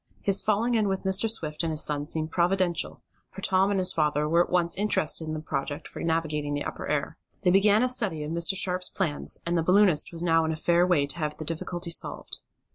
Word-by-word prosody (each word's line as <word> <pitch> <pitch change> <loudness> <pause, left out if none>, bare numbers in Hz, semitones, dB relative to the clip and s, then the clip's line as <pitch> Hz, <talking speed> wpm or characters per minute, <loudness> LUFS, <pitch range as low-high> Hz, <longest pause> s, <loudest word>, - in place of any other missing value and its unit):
His 195 -1 +3
falling 220 +3 +1
in 220 -3 +2
with 190 -1 -2
Mr. 190 +3 +1
Swift 155 -9 0
and 165 -1 -1
his 155 -1 +2
son 145 -1 0
seemed 160 0 -3
providential, 175 -1 0 0.3
for 195 - -10
Tom 190 0 +2
and 200 - 0
his 185 - +2
father 150 -1 0
were 170 +2 +3
at - - -11
once 175 -1 +1
interested 170 -5 0
in 155 - -3
the - - -4
project 145 0 -4
for - - -10
navigating 155 -3 -1
the 145 - -3
upper - - -6
air. - - -2 0.3
They 180 - +4
began 205 +4 +4
a - - +2
study 205 -11 0
of 150 - -5
Mr. 170 +3 +2
Sharp's 180 -1 0
plans, 165 -7 -1
and 170 +1 -1
the 165 - +2
balloonist 180 -2 +3
was 170 0 -5
now 165 -1 +3
in 160 - -1
a - - -2
fair 170 +2 +2
way 160 -6 +2
to 140 +5 -4
have 150 -1 -3
the 155 - -7
difficulty 170 +2 -4
solved. - - -1
170 Hz, 235 wpm, -26 LUFS, 155-190 Hz, 0.3 s, They